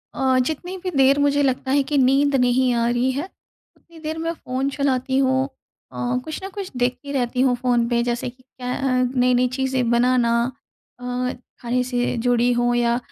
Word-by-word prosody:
अ, 260 -1 +2
जितनी 350 +6 -4
भी 370 - -1
देर 270 +1 +5
मुझे 285 0 +2
लगता 260 0 0
है 280 +1 +4
कि 295 - +1
नींद 275 +2 +3
नहीं 250 0 +3
आ 235 0 +1
रही 245 +2 +1
है, 280 +4 -3 0.5
उतनी 335 -1 -18
देर 315 +1 -4
मैं 330 +1 -2
फ़ोन 265 -3 -3
चलाती 265 -2 0
हूँ 260 -1 +2 0.5
अ, 245 +1 -2
कुछ 315 -1 -5
न 385 - -5
कुछ 390 -2 -5
देखती 250 +3 -1
रहती 250 -2 -1
हूँ 255 -2 +3
फ़ोन 240 -1 +1
पे। 240 -1 +2
जैसे 240 +1 -2
कि 255 +1 -19
क्या 250 -1 -6
अ, 255 -2 +1
नई-नई 250 0 +3
चीज़ें 260 -2 0
बनाना 240 0 +3 0.7
अ, 250 0 -2 0.3
खाने 250 +1 0
से 245 -1 -1
जुड़ी 245 0 +3
हों 240 0 +1
या 240 0 +2
255 Hz, 190 wpm, -22 LUFS, 245-275 Hz, 0.7 s, देर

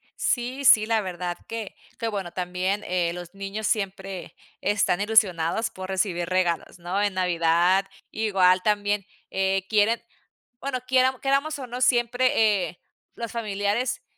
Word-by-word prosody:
Sí, 255 +3 -1
sí, 215 -3 +7
la 225 -1 +2
verdad 180 -2 -4
que 225 -3 -6 0.2
que 230 - -1
bueno 195 -5 -3
también, 185 +3 -2
eh, 175 -1 0
los 175 0 -8
niños 195 +2 -4
siempre 195 -2 -3 0.3
están 205 -3 +1
ilusionados 210 -1 +2
por 185 0 -8
recibir 185 -3 -1
regalos, 180 -1 -1
¿no? 180 +4 -2
En 205 -1 +1
Navidad, 180 +1 +2 0.3
igual 190 -4 +3
también, 205 -1 +1 0.2
eh, 190 0 0
quieren, 220 +2 +3 0.6
bueno, 270 -1 -3
quieram 260 0 +3
queramos, 280 +3 0
o, 265 - -5
no 245 +1 -6
siempre, 240 -5 +3
eh, 180 - -15 0.4
los 230 -1 -5
familiares 215 +1 -1
200 Hz, 140 wpm, -25 LUFS, 185-230 Hz, 0.6 s, sí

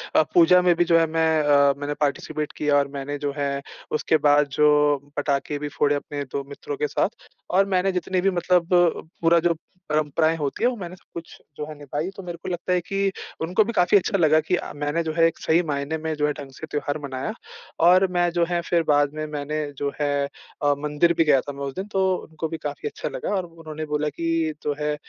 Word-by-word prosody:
अ, 155 - +6
पूजा 180 +1 +6
में 180 -1 +4
भी 175 - +3
जो 165 -1 +4
है 165 - +4
मैं 160 0 +1 0.2
अ, 140 -1 +5
मैंने 145 +1 -3
पार्टिसिपेट 150 +1 -1
किया 150 -1 +2
और 140 0 +2
मैंने 145 +1 -4
जो 140 -1 -3
है 140 -1 -1 0.3
उसके 155 +1 +2
बाद 145 0 +5
जो 150 -1 +4 0.2
पटाखे 145 0 -1
भी 150 - -3
फोड़े, 145 0 +1
अपने 145 0 -4
2 140 +1 -4
मित्रों 420 - -6
के 445 +1 0
साथ - - 0 0.4
और 195 +2 +4
मैंने 190 +1 +2
जितनी 180 0 -1
भी 195 - +3
मतलब 175 -1 +2 0.5
पूरा 170 0 +5
जो 170 0 +2 0.4
परंपराएँ 155 +2 +1
होती 145 +8 -3
है 245 - +5
वो 250 - -4
मैंने 180 -1 -7
सब - - -25
कुछ 170 0 -9 0.2
जो 150 - -4
है 155 - -8
निभाई, 145 +4 -4
तो 195 - -8
मेरे 175 -1 -6
को - - -4
लगता 175 +1 -2
है 180 - +3
कि 195 +1 -1 0.3
उनको 180 +6 +2
भी 235 +2 -4
काफ़ी 180 +1 +4
अच्छा 195 +1 0
लगा 155 -2 +4
कि 180 - 0
अ, - - -5
मैंने 145 +3 -1
जो 160 - -2
है 165 - +6
एक 165 - -4
सही 165 +2 +3
मायने 145 +1 -2
में 160 0 -3
जो 150 0 +1
है 150 - 0
ढंग 140 -1 -8
से 160 - -8
त्योहार 145 0 -2
मनाया 130 +9 -4 0.5
और 185 +2 +6
मैं 175 -1 +2
जो 170 0 +1
है 175 -1 +1
फिर 170 -1 +1
बाद 145 0 +3
में 155 0 -4
मैंने 150 +1 -3 0.2
जो 140 0 -1
है 145 -1 +1 0.5
अ, 145 0 +4
मंदिर 150 +3 +2
भी 165 - +5
गया 145 -4 +4
था 145 - -6
मैं 140 0 -7
उस 135 - -5
दिन 195 +2 -4
तो 190 0 +2 0.2
उनको 160 0 -4
भी 165 0 -5
काफ़ी 145 - -5
अच्छा - - -5
लगा - - -5
और 185 -2 -1
उन्होंने 155 -2 -8
बोला 150 0 -1
कि 165 -1 -1
जो 145 - 0
है, 150 0 0
155 Hz, 235 wpm, -24 LUFS, 145-175 Hz, 0.5 s, अ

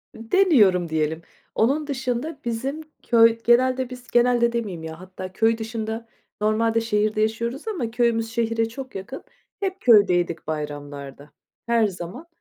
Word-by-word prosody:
Deniyorum, 225 - +3
diyelim. 160 +1 -1 0.3
Onun 280 +7 +1
dışında 265 +2 -3
bizim 265 +6 -3 0.2
köy 230 -1 +5
genelde 255 +1 +3
biz 250 -1 -10
genelde 240 -1 +3
demeyeyim 200 -9 -3
ya, 160 0 -7
hatta 185 0 -9
köy 225 +1 +2
dışında, 225 0 -5 0.3
normalde 225 +2 +2
şehirde 215 -1 0
yaşıyoruz 235 - -2
ama 270 - -3
köyümüz 230 -1 +1
şehre 225 0 0
çok 260 +2 -9
yakın. 195 +8 -7 0.4
Hep 390 -1 -3
köydeydik 180 -8 +4
bayramlarda, 145 -2 -6 0.4
her 230 -2 +3
zaman. 185 - -8
225 Hz, 130 wpm, -23 LUFS, 190-245 Hz, 0.4 s, köy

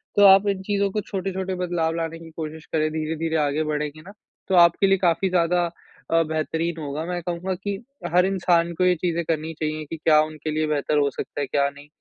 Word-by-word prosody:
तो 205 - +5
आप 195 +1 +7
इन 195 -1 0
चीज़ों 200 0 0
को 210 - -1
छोटे-छोटे 190 -1 -3
बदलाव 175 -3 -1
लाने 165 0 -3
की 165 0 -11
कोशिश 160 0 -6
करें, 155 -1 +2
धीरे-धीरे 160 +1 -2
आगे 150 0 +1
बढ़ेंगे 150 0 -3
ना 195 +5 -13 0.3
तो 190 - +1
आपके 170 +2 +5
लिए 195 0 +4
काफ़ी 180 +1 +1
ज़्यादा 175 0 +2 0.5
अ, 165 0 +4
बेहतरीन 160 +1 -2
होगा 145 +1 -4
मैं 175 0 -3
कहूँगा 175 +2 -3
कि 200 +2 -4 0.4
हर 180 +1 +5
इंसान 175 -3 +2
को 180 - 0
ये 180 0 +4
चीज़ें 170 0 -1
करनी 160 0 -2
चाहिए 155 0 -2
कि 165 - -5
क्या 155 -1 +4
उनके 155 0 -4
लिए 155 0 0
बेहतर 150 0 0
हो 145 -1 +3
सकता - - -5
है - - 0
क्या 140 +1 +1
नहीं, 145 +1 -14
165 Hz, 215 wpm, -24 LUFS, 155-180 Hz, 0.5 s, आप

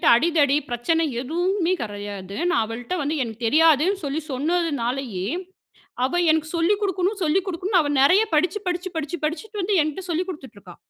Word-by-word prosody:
அடிதடி 290 0 +3
பிரச்சனை 320 +8 +1 0.2
எதுவுமே 350 +6 0
கிடையாது. 205 -3 -6
நான் 230 - +2
அவள்ட்ட 235 +7 -5
வந்து 290 +2 -1
எனக்கு 225 0 -8
தெரியாதுனு 320 - +4
சொல்லி 290 +2 -2
சொன்னதுனாலேயே, 270 - -1 0.8
அவ 265 - -3 0.2
எனக்கு 315 0 0
சொல்லி 335 +5 +3
குடுக்கணும், 390 +1 -1
சொல்லி 330 +5 +2
குடுக்கணும். 370 +2 +1
அவ 290 - -2
நெறைய 365 +10 +6
படிச்சி 355 +6 +1
படிச்சி 360 +1 -2
படிச்சி 320 +3 -3
படிச்சிட்டு 405 +6 -4
வந்து 400 +2 +1
என்ட்ட 310 +5 -4
சொல்லிக் 345 +3 -1
குடுத்துட்டு 275 - -9
இருக்கா. 180 -3 -13
315 Hz, 155 wpm, -23 LUFS, 255-360 Hz, 0.8 s, நெறைய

